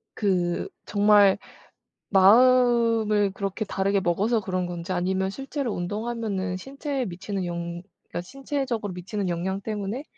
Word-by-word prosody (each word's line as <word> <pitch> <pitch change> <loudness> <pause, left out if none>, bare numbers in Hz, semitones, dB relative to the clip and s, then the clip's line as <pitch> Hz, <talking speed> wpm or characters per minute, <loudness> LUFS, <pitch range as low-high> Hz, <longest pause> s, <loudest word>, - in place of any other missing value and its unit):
그 180 -4 0 0.2
정말 205 -1 +5 0.7
마음을 230 -1 +5
그렇게 200 +2 -3
다르게 195 0 0
먹어서 200 +6 +1
그런 185 -2 -2
건지 175 +1 -5
아니면 190 +1 0
실제로 270 +1 -4
운동하면은 205 0 -3
신체에 275 - -4
미치는 190 +2 -4
영 170 0 -4 0.3
그러니까 - - -4
신체적으로 265 -2 -3
미치는 190 +2 -4
영향 180 +3 -2
때문에 210 +5 -4
200 Hz, 320 characters per minute, -25 LUFS, 185-230 Hz, 0.7 s, 정말